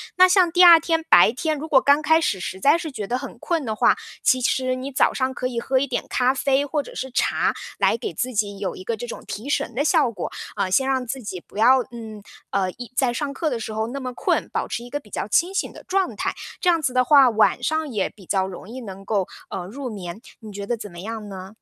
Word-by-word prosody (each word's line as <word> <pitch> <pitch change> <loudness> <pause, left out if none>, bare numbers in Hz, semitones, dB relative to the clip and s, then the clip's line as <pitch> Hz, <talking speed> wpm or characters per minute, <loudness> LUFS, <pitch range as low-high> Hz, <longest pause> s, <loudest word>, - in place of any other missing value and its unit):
那 370 0 +7
像 365 -2 +4
第 360 +1 +5
2 340 -2 +10
天 325 0 0
白 175 +5 +7
天， 305 +4 -2
如 310 +3 -6
果 275 -4 +5
刚 285 +2 +4
开 320 +1 +4
始 195 - 0
实 190 +2 -5
在 290 - +4
是 320 -3 -6
觉 210 -6 -5
得 250 - -1
很 255 -3 -8
困 335 -4 -1
的 220 -1 -2
话， - - +4 0.3
其 255 0 +3
实 255 +1 +1
你 265 +2 -6
早 - - +3
上 260 0 -1
可 255 - -5
以 240 -2 -3
喝 260 +2 0
一 280 - +1
点 - - -2
咖 255 +1 +2
啡 275 +1 +1
或 295 +1 -1
者 - - -12
是 265 -1 -5
茶， - - +1 0.2
来 - - +3
给 430 - -5
自 255 0 -3
己 205 -2 -1
有 190 -3 -3
一 185 - -9
个 230 - -2
这 240 - -5
种 - - -8
提 225 +8 -6
神 240 - -1
的 285 - +1
效 305 -8 +3
果， 195 - -5 0.2
呃， 185 - -1
先 265 +6 +3
让 260 -2 0
自 260 +2 -5
己 185 -5 -6
不 - - -13
要 255 +4 +6
嗯， 220 -3 -9 0.3
呃， 190 -2 0
一 245 +4 -10
在 255 -3 +2
上 280 +2 -3
课 315 +2 -1
的 240 -4 -3
时 220 0 -5
候 220 +1 -1
那 275 +3 -5
么 255 -1 -5
困， - - 0
保 - - -2
持 235 - -4
一 245 - -10
个 290 - -3
比 210 - -19
较 200 - -4
清 350 - +2
醒 390 - -1
的 - - -12
状 385 -1 0
态。 - - -2 0.3
这 360 - +3
样 335 -2 +3
子 255 -3 -1
的 255 0 +4
话， 275 -4 +7
晚 220 -1 +2
上 315 0 0
也 205 -6 -1
比 195 -4 -17
较 190 0 0
容 190 +2 -9
易 255 +2 -7
能 195 -2 -9
够， 200 -4 0 0.2
呃， 180 -2 -5
入 255 +6 -6
眠， 195 0 -7 0.2
你 215 -2 -10
觉 200 0 -6
得 240 - -1
怎 210 -4 -8
么 170 - -10
样 215 +1 -6
呢？ 190 0 -8
250 Hz, 290 characters per minute, -23 LUFS, 210-285 Hz, 0.3 s, 2